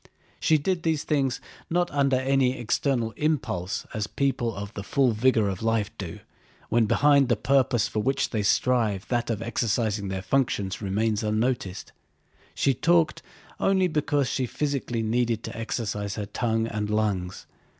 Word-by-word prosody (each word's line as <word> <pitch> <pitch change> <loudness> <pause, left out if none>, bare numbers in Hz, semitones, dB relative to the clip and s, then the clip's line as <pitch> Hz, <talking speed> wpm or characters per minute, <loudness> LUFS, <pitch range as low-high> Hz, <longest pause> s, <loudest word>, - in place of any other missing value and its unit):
She 160 - +4
did 175 +4 -1
these 160 -3 0
things 135 -4 0 0.3
not 175 +1 +1
under 140 -2 +2
any 130 0 +2
external 120 0 0
impulse 120 - -1
as 105 -1 -2
people 120 -5 -1
in 100 0 -4
the 100 - -5
full 130 +5 +2
vigor 110 -1 +2
of 95 -2 -3
life 115 -2 0
do, - - -5 0.5
when 115 -1 +3
behind 140 +1 +4
the 120 - +4
purpose 125 -1 +2
for 110 - -2
which 135 +5 0
they 110 - 0
strive 110 -2 +1
that 120 -1 0
of 115 -1 -2
exercising 110 -3 -1
their 95 -1 -4
functions 100 -4 0
remains 105 +2 0
unnoticed. 110 -2 -1 0.6
She 135 - +2
talked 165 +3 +2 0.4
only 190 -1 +3
because 145 -4 0
she 130 0 -1
physically 135 -5 -2
needed 115 0 0
to - - -6
exercise 105 -3 -3
her 105 - -3
tongue 115 +1 -1
and 105 -2 -3
lungs. 105 -4 -1
120 Hz, 155 wpm, -26 LUFS, 105-135 Hz, 0.6 s, She